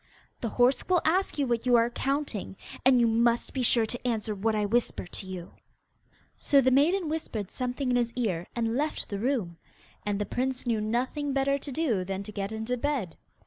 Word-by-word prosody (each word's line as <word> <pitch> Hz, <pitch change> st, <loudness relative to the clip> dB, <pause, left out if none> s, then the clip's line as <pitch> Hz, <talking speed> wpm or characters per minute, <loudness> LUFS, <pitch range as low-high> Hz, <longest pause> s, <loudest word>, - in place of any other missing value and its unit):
The 230 Hz, -, -2 dB
horse 245 Hz, -, +2 dB
will 360 Hz, -2 st, +3 dB
ask 365 Hz, +3 st, +1 dB
you 285 Hz, -, +2 dB
what 240 Hz, -1 st, -1 dB
you 245 Hz, -, +6 dB
are 235 Hz, 0 st, +4 dB
counting, 275 Hz, -8 st, -2 dB, 0.3 s
and 255 Hz, -1 st, +6 dB
you 235 Hz, -, +5 dB
must 230 Hz, +1 st, +2 dB
be 265 Hz, -, -1 dB
sure 235 Hz, -1 st, +3 dB
to 245 Hz, +3 st, -3 dB
answer 220 Hz, -2 st, -1 dB
what 215 Hz, +2 st, 0 dB
I 210 Hz, -1 st, +1 dB
whisper 235 Hz, 0 st, 0 dB
to 180 Hz, -, -7 dB
you.' 185 Hz, -2 st, -7 dB, 0.9 s
So 280 Hz, -, +4 dB
the 260 Hz, -1 st, +4 dB
maiden 325 Hz, +7 st, +3 dB
whispered 240 Hz, -, -3 dB
something 250 Hz, +1 st, -2 dB
in 245 Hz, -, +3 dB
his 235 Hz, -1 st, +1 dB
ear, 195 Hz, -9 st, -1 dB
and 230 Hz, -1 st, 0 dB
left 300 Hz, +3 st, -1 dB
the 200 Hz, -, -3 dB
room. 220 Hz, -9 st, -1 dB, 0.5 s
And 205 Hz, -1 st, -1 dB
the 205 Hz, -, -1 dB
prince 260 Hz, +3 st, -2 dB
knew 230 Hz, -3 st, +1 dB
nothing 255 Hz, +6 st, -1 dB
better 275 Hz, +1 st, +1 dB
to 280 Hz, -, -6 dB
do 245 Hz, -, 0 dB
than 195 Hz, +1 st, -4 dB
to 210 Hz, -, -8 dB
get 200 Hz, 0 st, -4 dB
into 220 Hz, +3 st, -2 dB
bed. 250 Hz, -, -2 dB
240 Hz, 205 wpm, -28 LUFS, 215-270 Hz, 0.9 s, you